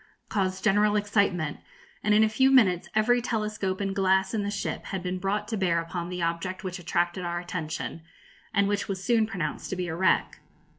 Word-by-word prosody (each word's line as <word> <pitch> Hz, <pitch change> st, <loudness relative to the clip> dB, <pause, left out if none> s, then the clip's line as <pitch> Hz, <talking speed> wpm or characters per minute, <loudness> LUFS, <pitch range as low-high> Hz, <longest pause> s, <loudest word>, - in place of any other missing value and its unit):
caused 190 Hz, -2 st, -1 dB
general 210 Hz, 0 st, +3 dB
excitement, 200 Hz, -7 st, +1 dB, 0.4 s
and 210 Hz, 0 st, +3 dB
in 215 Hz, -, +6 dB
a -, -, +5 dB
few 260 Hz, +5 st, +3 dB
minutes 200 Hz, -10 st, +4 dB
every 240 Hz, +3 st, +3 dB
telescope 210 Hz, -4 st, -2 dB
and 195 Hz, -1 st, -2 dB
glass 190 Hz, 0 st, +2 dB
in 220 Hz, -, 0 dB
the 200 Hz, -, -2 dB
ship 205 Hz, -1 st, -3 dB
had 190 Hz, -2 st, -4 dB
been 185 Hz, 0 st, -2 dB
brought 200 Hz, +2 st, -1 dB
to 225 Hz, -, -2 dB
bear 180 Hz, -4 st, +1 dB
upon 170 Hz, +1 st, -4 dB
the 180 Hz, -1 st, -3 dB
object 170 Hz, +4 st, -2 dB
which 185 Hz, 0 st, -4 dB
attracted 175 Hz, +1 st, -1 dB
our 175 Hz, 0 st, -2 dB
attention, 170 Hz, -2 st, -5 dB, 0.5 s
and 200 Hz, -2 st, +2 dB
which 205 Hz, 0 st, -1 dB
was 190 Hz, -1 st, -4 dB
soon 230 Hz, -2 st, +3 dB
pronounced 180 Hz, -9 st, -4 dB
to -, -, -2 dB
be 180 Hz, -1 st, -3 dB
a 160 Hz, -, -3 dB
wreck. 185 Hz, +2 st, +1 dB
195 Hz, 200 wpm, -27 LUFS, 180-210 Hz, 0.5 s, in